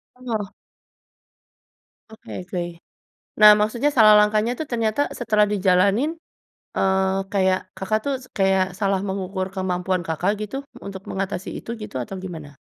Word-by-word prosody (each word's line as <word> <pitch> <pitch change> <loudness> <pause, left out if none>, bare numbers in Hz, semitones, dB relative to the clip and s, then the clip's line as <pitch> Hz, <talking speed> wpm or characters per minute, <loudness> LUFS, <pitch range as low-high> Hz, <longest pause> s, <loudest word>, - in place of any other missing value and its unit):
Bener. 235 -5 -3 1.7
Oke 220 -4 -9
oke, 180 0 -3 0.8
nah 210 0 +11
maksudnya 235 +7 +1
salah 220 -6 +7
langkahnya 210 +3 +3
tuh 285 - -4
ternyata 230 +3 0
setelah 215 -3 +1
dijalanin, 200 - +2 0.6
eee, 190 0 +2 0.2
kayak 185 -1 +1
Kakak 205 +3 -1
tuh 280 - 0
s - - -12
kayak 190 -1 +2
salah 195 -2 +1
mengukur 190 -1 -3
kemampuan 185 -1 -2
Kakak 180 +6 0
gitu 215 +6 -5 0.2
untuk 195 -1 -8
mengatasi 195 -1 -3
itu 230 - -6
gitu 210 - -6
atau 125 +8 -5
gimana? 155 -7 -8
195 Hz, 130 wpm, -23 LUFS, 185-215 Hz, 1.7 s, nah